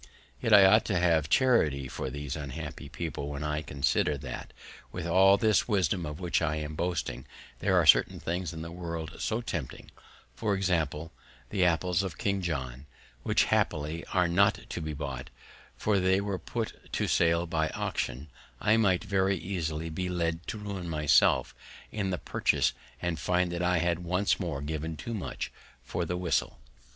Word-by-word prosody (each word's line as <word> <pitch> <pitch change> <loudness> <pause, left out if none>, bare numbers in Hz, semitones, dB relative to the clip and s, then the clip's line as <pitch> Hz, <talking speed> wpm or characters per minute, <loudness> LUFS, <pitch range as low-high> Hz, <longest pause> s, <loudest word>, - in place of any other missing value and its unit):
Yet 115 - 0
I 100 -2 +9
ought 105 +3 +6
to 95 - 0
have 80 -4 +2
charity 80 - +3
for - - -4
these 70 -1 -5
unhappy 70 -4 -6
people, 75 -4 -4
when 70 0 -5
I 75 0 -1
consider, 75 +2 0
that, 65 -3 -7 0.4
with 85 -1 -5
all 95 +3 +6
this 110 -3 +3
wisdom 90 -5 +1
of 75 0 -6
which 90 -2 0
I 75 - +1
am 75 0 -4
boasting, 75 -7 -3 0.3
there - - +2
are - - +4
certain - - +5
things 85 0 -3
in 80 -1 -6
the 85 - -7
world 85 -3 -5
so 110 +2 -1
tempting, 85 - -5 0.4
for 105 -3 0
example, 80 -4 -1 0.4
the 95 -3 +2
apples 90 +1 +2
of 95 -5 -5
King 100 -1 0
John, 70 -5 -4 0.3
which - - +3
happily 75 +2 0
are 90 -2 +2
not 95 +4 +3
to - - -4
be 80 -1 -4
bought; 70 -3 -5 0.5
for 105 -2 +1
if - - +2
they 95 +1 +3
were 100 -2 -2
put - - -5
to - - 0
sale 85 0 +3
by 80 -2 0
auction, 65 +5 -3 0.3
I 110 +2 +3
might 95 -5 +3
very 95 0 +1
easily 80 -4 -3
be 90 +3 -3
led 85 -1 -2
to 115 - -3
ruin 100 -4 -5
myself 75 -4 +3 0.4
in 100 -3 -2
the 90 - -1
purchase, - - +1 0.3
and 85 -2 -1
find 90 -1 +1
that 85 0 -3
I 90 0 +2
had 85 0 +1
once 90 +3 +1
more 80 -7 -3
given 80 +1 -4
too 115 +10 -5
much 105 - -4 0.3
for 85 - -3
the 90 +2 -2
whistle. 90 -7 0
85 Hz, 180 wpm, -29 LUFS, 75-95 Hz, 0.5 s, I